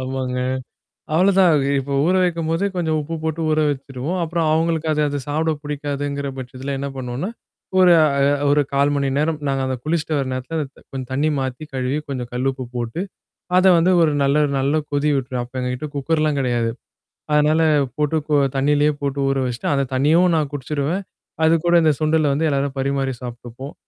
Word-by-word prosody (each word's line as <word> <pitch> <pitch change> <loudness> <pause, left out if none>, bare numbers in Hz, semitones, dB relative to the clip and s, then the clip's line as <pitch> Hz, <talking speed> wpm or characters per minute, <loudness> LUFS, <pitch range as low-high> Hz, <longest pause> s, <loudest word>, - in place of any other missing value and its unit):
ஆமாங்க. 130 -1 -3 0.8
அவ்வளோதான். 185 0 +4 0.3
இப்போ, 135 +1 -4
ஊற 180 +3 +3
வைக்கும்போதே 165 +1 0
கொஞ்சம் 160 -3 0
உப்பு 165 +3 -5
போட்டு 160 +1 -2
ஊற 155 - +1
வச்சுருவோம். 140 +4 -3
அப்புறம் 165 0 -1
அவங்களுக்கு 160 0 0
அது 150 - 0
அத 145 0 -2
சாப்பிட 160 +2 0
புடிக்காதுங்கிற 145 -1 -3
பட்சத்துல 130 +2 -5
என்ன 140 - -3
பண்ணுவோன்னா? 130 - -4 0.5
ஒரு 180 -1 +7
அ - - +5 0.4
ஒரு 145 +1 +4
1/4 140 +1 +3
மணி 140 -1 0
நேரம், 155 +1 0
நாங்க 135 -1 0
அத 130 - -1
குளிச்சுட்டு 155 -1 0
வர 135 - 0
நேரத்தில 130 +6 -4
அந்த 140 -2 -7
கொஞ்சம் 130 -2 -6
தண்ணி 145 +4 +1
மாத்தி, 130 +1 -4
கழுவி, 130 +2 -1
கொஞ்சம் 125 -3 -4
கல்லு 130 +2 0
உப்பு 130 -1 -7
போட்டு 120 +7 -3 0.6
அத 185 - +4
வந்து 170 +3 +3
ஒரு 155 -2 +3
நல்ல 140 +2 +3 0.2
நல்ல 135 +2 +1 0.2
கொதி 145 +1 +1
விட்டுரும். 130 -2 -2
அப்ப 125 +2 -8
எங்ககிட்ட 125 +3 -3
குக்கர்லாம் 155 +1 0
கிடையாது. 120 -3 0 0.6
அதனால 150 +2 +4 0.4
போட்டு 150 +1 0
இப்போ 150 0 -1 0.2
தண்ணியிலே 145 +2 +3
போட்டு 140 0 -2
ஊற 135 - 0
வச்சுட்டு, 120 -2 -3
அந்த 140 -1 +1
தண்ணியவும் 160 +7 +4
நான் 150 -2 0
குடிச்சுடுவேன். 145 +6 -2 0.4
அது 160 +1 +5
கூட 175 0 +4
இந்த 155 - +5
சுண்டல 155 -1 +2
வந்து 160 +3 +1
எல்லாரும் 140 -1 -1
பரிமாறி 135 0 0
சாப்ட்டுப்போம். 120 +2 -8
145 Hz, 175 wpm, -21 LUFS, 130-160 Hz, 0.8 s, ஒரு